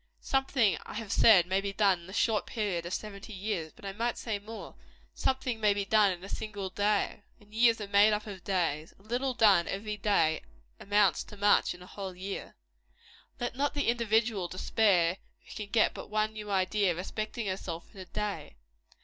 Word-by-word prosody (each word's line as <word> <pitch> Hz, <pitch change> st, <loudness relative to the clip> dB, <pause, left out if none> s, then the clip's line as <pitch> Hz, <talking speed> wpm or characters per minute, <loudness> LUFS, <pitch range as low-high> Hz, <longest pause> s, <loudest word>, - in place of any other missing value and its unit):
Something, 270 Hz, -6 st, +1 dB
I -, -, -9 dB
have 215 Hz, -2 st, -5 dB
said, 190 Hz, -6 st, +6 dB
may 190 Hz, +2 st, 0 dB
be 200 Hz, 0 st, -3 dB
done 195 Hz, -3 st, +3 dB
in 170 Hz, -, -14 dB
the -, -, -10 dB
short 220 Hz, 0 st, +1 dB
period 190 Hz, -6 st, -2 dB
of 175 Hz, -, -5 dB
seventy 210 Hz, 0 st, -7 dB
years. 190 Hz, -5 st, -3 dB
But -, -, -15 dB
I 195 Hz, -, -4 dB
might 230 Hz, +3 st, -1 dB
say 215 Hz, -3 st, -3 dB
more. 220 Hz, +2 st, -9 dB, 0.4 s
Something 260 Hz, -3 st, -1 dB
may 210 Hz, -2 st, +3 dB
be 200 Hz, -1 st, -1 dB
done 210 Hz, -1 st, +4 dB
in 180 Hz, 0 st, -6 dB
a -, -, -7 dB
single 200 Hz, -3 st, -5 dB
day. 205 Hz, +1 st, 0 dB, 0.2 s
And 210 Hz, 0 st, -21 dB
years 230 Hz, 0 st, +4 dB
are 205 Hz, -, -5 dB
made 200 Hz, +2 st, +5 dB
up 210 Hz, 0 st, -1 dB
of 195 Hz, -4 st, -8 dB
days. 165 Hz, -5 st, -1 dB
A 195 Hz, -, -23 dB
little 250 Hz, +4 st, -1 dB
done, 200 Hz, -7 st, +5 dB
every 210 Hz, +1 st, -4 dB
day, 195 Hz, -6 st, +2 dB, 0.4 s
amounts 205 Hz, -2 st, +2 dB
to 210 Hz, -, -12 dB
much 205 Hz, -2 st, +3 dB
in 180 Hz, -, -13 dB
a -, -, -12 dB
whole 190 Hz, -1 st, -7 dB
year. 195 Hz, +2 st, -6 dB, 0.8 s
Let 240 Hz, -1 st, -3 dB
not 285 Hz, +2 st, 0 dB
the 285 Hz, -4 st, +1 dB
individual 225 Hz, -4 st, +1 dB
despair 185 Hz, -1 st, +2 dB, 0.3 s
who -, -, -11 dB
can 210 Hz, -2 st, -6 dB
get 220 Hz, +1 st, +3 dB
but -, -, -9 dB
one 215 Hz, +1 st, 0 dB
new 210 Hz, -1 st, -7 dB
idea 195 Hz, -1 st, +1 dB
respecting 215 Hz, +5 st, -4 dB
herself, 185 Hz, -2 st, -5 dB
in 195 Hz, -, -10 dB
a -, -, -8 dB
day. 210 Hz, +1 st, -4 dB
205 Hz, 200 wpm, -30 LUFS, 190-220 Hz, 0.8 s, said